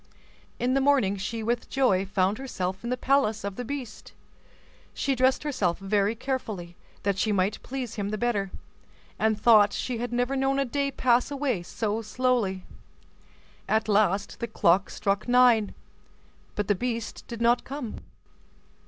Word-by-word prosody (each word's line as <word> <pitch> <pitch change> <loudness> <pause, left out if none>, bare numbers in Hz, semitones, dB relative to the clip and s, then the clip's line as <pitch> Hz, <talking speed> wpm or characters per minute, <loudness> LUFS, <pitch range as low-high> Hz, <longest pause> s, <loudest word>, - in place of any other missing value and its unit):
In 250 +1 0
the 275 - +2
morning 265 -8 +3
she 220 +4 -4
with 235 +2 -1
joy 195 -8 +2
found 195 +2 +1
herself 190 -7 -4
in 235 - -3
the 250 - -1
palace 250 -7 +1
of 200 -1 -4
the 245 - -4
beast. 250 -3 -7 0.8
She 275 - 0
dressed 260 +2 +2
herself 210 - 0
very 200 +2 0
carefully, 215 -9 -4 0.3
that 195 -1 0
she 215 - +1
might 195 +1 0
please 255 -4 -5
him 205 -1 -3
the 215 - -2
better, 210 -4 0 0.7
and 220 -1 +1
thought 210 -3 +6
she 245 -3 -3
had 245 0 -3
never 245 +2 0
known 270 0 +1
a 275 - +1
day 280 +2 -1
pass 250 -2 +2
away 275 -8 -1
so 215 +5 -2
slowly. 225 -5 0 1.1
At 220 0 +2
last 200 -1 +1
the 235 - -3
clock 195 -3 +2
struck 200 +1 -1
nine, 245 -4 +4 0.8
but 205 -1 -2
the 205 - +4
beast 230 +2 -4
did 235 -2 -7
not 235 +1 +3
come. 270 -5 -6
225 Hz, 160 wpm, -27 LUFS, 200-255 Hz, 1.1 s, thought